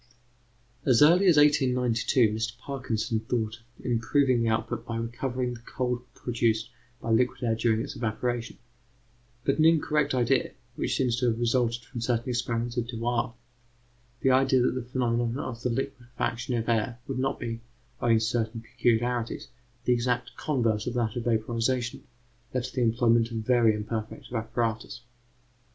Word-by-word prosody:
As 130 0 +5
early 175 +6 +6
as 170 -4 +6
1892, 125 -5 +3
Mr 110 +2 -3
Parkinson 120 -4 -2
thought 110 -1 -2 0.2
of - - -17
improving 125 +1 +2
the 115 - +2
output 110 +1 -1
by 115 - -5
recovering 125 +2 -2
the 120 - -9
cold 125 +1 -2
produced 115 -2 0 0.3
by 115 - -3
liquid 125 +2 +2
air 115 -2 +2
during 110 0 +1
its - - -7
evaporation; 120 +1 -2 0.9
but 140 +3 +1
an 155 - +5
incorrect 150 -3 +3
idea, 125 +1 +2 0.2
which - - -1
seems 125 -3 +1
to 125 - +2
have 115 -1 0
resulted 120 -1 +1
from 120 0 -7
certain 120 +1 0
experiments 120 0 -1
of 120 -1 0
Dewar 120 0 -1 0.9
the 135 - +4
idea 130 -1 +4
that - - +3
the 130 - -2
phenomenon 120 -1 -1
of 120 -4 -5
the 125 - 0
liquefaction 125 -1 -3
of 115 -1 -2
air 115 0 0
would 135 -2 -3
not 135 +1 -1
be, 115 -1 -4 0.4
owing 115 -1 +4
to 110 - +1
certain 115 0 -1
peculiarities, 120 0 -1 0.4
the 125 - +4
exact 125 +1 -1
converse 115 -8 0
of 125 - -2
that 115 -3 0
of 120 -2 -3
vaporization 120 +2 0 0.5
led 130 - +1
to 130 - -6
the 130 - +1
employment 115 0 +3
of 115 - -4
very 115 -1 +3
imperfect 110 +2 -5
apparatus. 115 +1 -2
120 Hz, 160 wpm, -27 LUFS, 115-125 Hz, 0.9 s, early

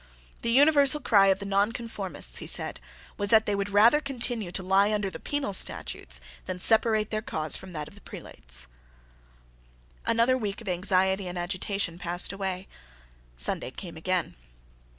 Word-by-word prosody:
The 235 - -1
universal 285 +3 +5
cry 200 -8 +5
of 190 -1 +4
the 200 - -6
Nonconformists, 200 0 -2
he - - -7
said, - - -2 0.4
was 205 0 0
that 220 0 +6
they 205 - 0
would 200 0 -1
rather 225 +9 +5
continue 240 -8 -3
to 185 - -2
lie 195 +3 +3
under 205 -2 -1
the - - -8
penal 290 -8 -2
statutes 65 - -3 0.3
than 185 - -3
separate 220 +2 +3
their 215 0 -1
cause 155 -7 0
from 190 -1 -9
that 150 -2 -5
of - - -14
the 205 - -16
prelates. - - -5 1.4
Another 235 +3 +3
week 205 -3 -3
of 225 - -11
anxiety 190 +1 +2
and 180 0 -5
agitation 180 0 -2
passed 175 +2 0
away. 190 -1 -4 0.7
Sunday 65 - 0
came 170 +5 -8
again. 180 +2 -1
200 Hz, 160 wpm, -27 LUFS, 180-225 Hz, 1.4 s, that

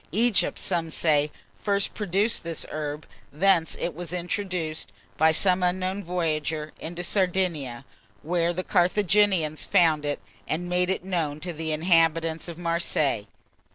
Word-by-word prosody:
Egypt, 220 +2 +2
some 170 -3 0
say, 150 -2 +2 0.3
first 200 -1 0
produced 205 +2 +1
this 165 -2 -4
herb; 150 0 -4 0.3
thence 170 +1 +2
it 175 - -2
was 170 0 -7
introduced, 175 -3 -3 0.2
by 160 +1 +4
some 185 +3 +3
unknown 185 +2 -1
voyager, 155 -3 -2
into 175 +2 -6
Sardinia, 175 - 0 0.4
where 170 +1 +1
the 180 +2 -3
Carthaginians 185 -4 +2
found 165 -6 +3
it, 145 0 -2 0.3
and 175 +3 -2
made 180 +1 +1
it 190 - -1
known 160 -6 -1
to 175 +1 -4
the 160 0 -3
inhabitants 165 0 +2
of 170 -2 -7
Marseilles. 165 -9 0
170 Hz, 135 wpm, -26 LUFS, 155-185 Hz, 0.4 s, by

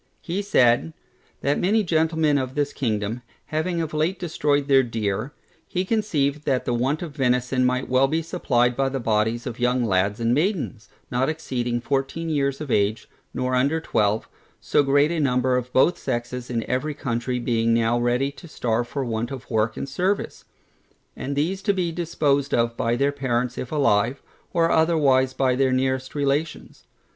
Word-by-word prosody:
He 180 +3 -2
said, 120 - +3 0.5
that 140 +2 +1
many 210 +4 +2
gentlemen 160 -3 +2
of 130 0 -4
this 145 -1 0
kingdom, 110 -1 -2 0.2
having 165 +3 -2
of 155 - -6
late 160 +5 0
destroyed 145 -5 0
their 135 -2 +6
deer, 110 0 -2 0.4
he 185 +1 -2
conceived 150 -10 0
that 130 -3 0
the 120 - 0
want 135 +7 0
of 155 -4 -8
venison 125 -1 +1
might 125 +1 0
be - - -12
well 135 +2 +3
supplied 125 -8 +1
by 135 +1 +1
the 135 0 -3
bodies 110 0 0
of 125 -1 -6
young 125 0 +1
lads 100 +1 +1
and 115 +1 +1
maidens, 150 - -1 0.2
not 125 +3 +1
exceeding 125 -6 -2
fourteen 135 +6 -2
years 140 -3 0
of 150 -4 -5
age, 105 +2 +1 0.2
nor 130 0 -2
under 140 +6 +2
twelve; 105 -8 0 0.3
so - - +2
great 145 +2 +3
a 170 - -1
number 125 -2 +2
of 125 0 -2
both 150 +8 +3
sexes 125 -1 -4
in 115 -2 -1
every 145 +4 -1
county 125 -2 -2
being 115 -1 +1
now 115 +1 +2
ready 125 +3 +1
to 170 +5 -13
starve 120 -5 -1
for 135 +1 -3
want 115 0 -2
of 135 -3 -8
work 110 0 0
and - - -4
service: 185 +8 -2 0.7
and 140 +1 -4
these 175 +7 -1
to 200 0 +1
be 180 -3 -1
disposed 150 -5 0
of 115 0 +1
by 115 +1 0
their 140 +3 +1
parents 125 -3 -1
if 125 - -6
alive, 135 -3 +2 0.3
or 165 -1 +2
otherwise 145 -5 +3
by 130 -2 +2
their 130 0 +2
nearest 130 +1 -1
relations. 145 +2 -2
130 Hz, 175 wpm, -23 LUFS, 120-150 Hz, 0.7 s, their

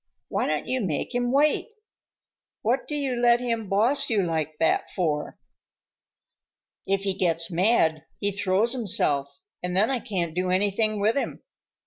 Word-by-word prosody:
"Why - - -1
don't - - -1
you 260 -1 -1
make 165 - -2
him 245 0 0
wait? 295 - +2 1.0
What 245 +4 0
do 295 - -4
you 275 -3 -1
let 240 0 +4
him 230 -4 -2
boss 250 +8 +3
you 210 -4 +2
like 155 -3 -2
that 160 - +1
for?" 155 -5 -2 1.5
"If 195 0 0
he 195 -1 0
gets 170 -2 0
mad 165 -4 +2
he 205 - 0
throws 205 +3 +1
himself, 145 - 0 0.2
and 180 0 -2
then 215 +6 +3
I 260 - 0
can't 175 -7 -2
do 180 +1 -1
anything 205 +3 +1
with 215 +3 +2
him. 280 - -3
200 Hz, 155 wpm, -25 LUFS, 175-240 Hz, 1.5 s, let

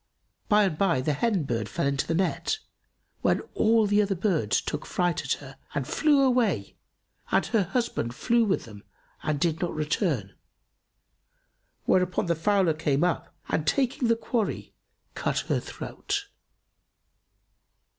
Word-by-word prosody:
By 210 -1 +5
and 170 -6 -1
by, 170 -9 +3
the 150 +3 0
hen 195 +3 +1
bird 115 -6 -2
fell - - -1
into 140 0 0
the 165 - 0
net, 190 - 0 0.6
when - - +2
all 225 0 +4
the 205 +1 +3
other 200 -1 0
birds 170 - +1
took - - -4
fright 175 -4 0
at 130 - +1
her 135 -1 -9 0.2
and 140 -2 -1
flew 295 -3 +3
away, 235 - +1 0.5
and - - +2
her 225 - +2
husband 185 - -2
flew 235 - +2
with 200 -3 0
them 105 -3 -12 0.4
and 150 -2 -1
did 165 0 0
not 175 - -2
return; 150 - -1 1.5
whereupon 180 -1 +2
the 170 - +2
fowler 185 0 +2
came 150 -1 0
up 180 -1 0 0.2
and 155 -1 0
taking 255 - +1
the 230 - +4
quarry, 230 -1 -2 0.4
cut - - -1
her - - 0
throat. 405 0 -4
175 Hz, 145 wpm, -27 LUFS, 145-215 Hz, 1.5 s, By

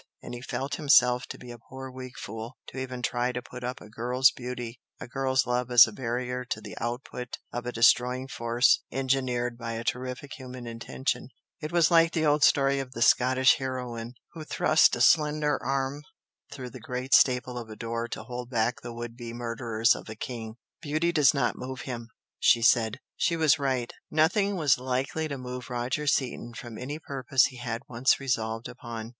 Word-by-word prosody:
And - - -7
he 120 - -6
felt 135 +2 -3
himself 125 -4 +4
to - - -7
be 125 -1 -10
a 120 - -10
poor 130 +3 -9
weak 130 -1 -9
fool 110 +4 -7
to 130 - -7
even 130 -1 -5
try 120 +1 0
to 125 - -3
put 125 0 -10
up 125 +1 -4
a - - -12
girl's 125 +4 +3
beauty, 125 -1 -6 0.2
a - - -7
girl's 130 0 +1
love 125 0 -1
as 120 -1 +9
a 110 - -7
barrier 125 +1 -3
to 125 -4 -4
the - - -9
output 125 +1 -5 0.2
of 120 0 -4
a - - -1
destroying 125 +2 +3
force 120 +1 +2
engineered 125 -2 -1
by 115 -1 -4
a 115 0 -4
terrific 125 +3 -4
human 130 -1 -8
intention, 115 +2 -3 0.3
it 155 +1 -4
was 170 -1 +4
like 165 -1 +5
the 160 -1 +1
old 150 0 +3
story 140 -2 +4
of 130 -1 -6
the 115 - +1
Scottish 130 +2 +5
heroine 125 -3 -5 0.2
who 160 - -7
thrust 155 +1 +4
a - - -3
slender 150 -2 +3
arm 135 +2 -1 0.5
through 125 -3 -7
the 130 - -9
great 125 +3 -4
staple 125 -1 +4
of 115 -2 -9
a 110 - -8
door 115 +1 -3
to 115 - -6
hold 125 +1 -6
back 120 0 0
the 120 - -7
would 120 0 -6
be 120 -1 -7
murderers 115 -1 +1
of - - -8
a 110 - -6
King. 110 -1 -6 0.3
"Beauty 155 +2 0
does 150 -5 +5
not 140 -4 0
move 130 -1 -6
him!" 120 -2 -6 0.3
she 115 -1 +4
said. 115 -2 +3 0.2
She 170 - +1
was 155 -3 +4
right. 130 -4 -1 0.2
Nothing 195 +6 +2
was 150 -8 +3
likely 130 +5 -1
to 140 -2 -4
move 125 -1 -7
Roger 125 +4 -2
Seaton 120 -4 -1
from 120 -2 -8
any 140 +4 -4
purpose 135 -3 +1
he 130 - -5
had 120 -2 -4
once 125 +2 +2
resolved 115 -4 -2
upon. 115 -1 -7
125 Hz, 195 wpm, -28 LUFS, 120-135 Hz, 0.5 s, as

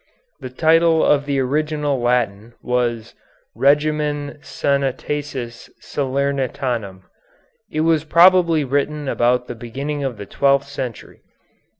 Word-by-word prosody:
The 130 - -7
title 160 +4 +3
of 145 -1 +2
the 140 -1 0
original 145 0 -1
Latin 120 -2 -1
was 120 -2 -1 0.4
"Regimen 145 0 +1
Sanitatis 140 -3 -3
Salernitanum." 130 -7 -2 0.7
It 155 - -2
was 160 -1 +2
probably 170 -1 +5
written 145 +2 -1
about 125 -1 +1
the - - -6
beginning 135 +5 -5
of 130 -5 -3
the 100 - -7
twelfth 140 +4 +1
century. 130 -4 -7
140 Hz, 105 wpm, -20 LUFS, 125-150 Hz, 0.7 s, probably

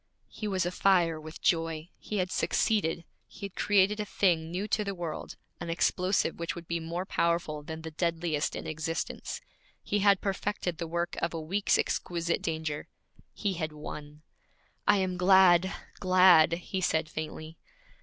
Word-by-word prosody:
He 215 - -5
was 190 -3 0
afire 175 -3 +2
with 155 +1 -10
joy. 165 0 0
He 210 - -4
had 185 -1 0
succeeded; 175 -7 +1 0.2
he - - -8
had 195 - -7
created 205 +1 +3
a - - 0
thing 170 -6 +1
new 185 +5 -3
to 210 - +1
the 200 -1 -4
world, 170 -3 -5 0.2
an - - -5
explosive 180 +1 +1
which 170 0 -3
would 170 -1 -9
be 170 0 -1
more 170 +3 -4
powerful 170 -5 0
than 160 +1 -7
the 160 - -6
deadliest 165 -2 -1
in - - -5
existence; 160 +1 -4 0.4
he 205 - 0
had 200 -1 +5
perfected 195 -3 -2
the 170 - -3
work 170 +1 -2
of 170 - -1
a - - -2
week's 190 +6 +1
exquisite 170 -1 -1
danger; 160 -2 -3 0.4
he 200 -3 -2
had 155 -3 -3
won. 150 0 -8 0.6
'I 205 0 +6
am 185 -1 -1
glad, 185 0 +6 0.3
glad!' 185 -3 +6
he 180 +2 -3
said 160 -3 +1
faintly. 155 +1 -7
170 Hz, 165 wpm, -29 LUFS, 160-190 Hz, 0.6 s, I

